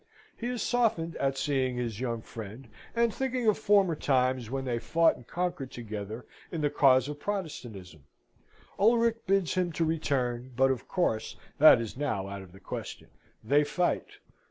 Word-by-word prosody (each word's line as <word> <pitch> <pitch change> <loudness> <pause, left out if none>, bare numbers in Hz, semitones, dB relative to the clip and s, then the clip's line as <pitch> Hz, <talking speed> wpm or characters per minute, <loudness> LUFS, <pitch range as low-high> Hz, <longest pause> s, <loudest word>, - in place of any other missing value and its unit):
He 240 - -5
is 245 -1 -2
softened 215 -9 +1
at 135 0 0
seeing 130 -3 0
his 115 -4 -3
young 115 -3 -3
friend, 115 +3 -9 0.3
and 235 -1 +2
thinking 255 -2 -2
of 215 - +3
former 200 -5 +4
times 130 -4 +1
when 135 +1 -3
they 120 -2 -1
fought 165 +6 +3
and 120 - -15
conquered 175 -7 -3
together 110 -1 -6 0.3
in 165 - -3
the 145 -1 +1
cause 130 -3 +4
of 145 0 -6
Protestantism. 120 - -5 0.8
Ulric 230 +1 +3
bids 195 -3 +2
him 180 -2 0
to 165 +2 0
return, 130 -6 -1
but 135 +1 +4
of 130 - -4
course 115 - -1 0.2
that 150 -4 +9
is 115 -2 -5
now 115 -10 -2
out 100 0 -6
of 95 -2 -13
the 95 - -15
question. - - -7 0.3
They 145 +7 +4
fight. 175 +4 -1
135 Hz, 170 wpm, -29 LUFS, 120-180 Hz, 0.8 s, that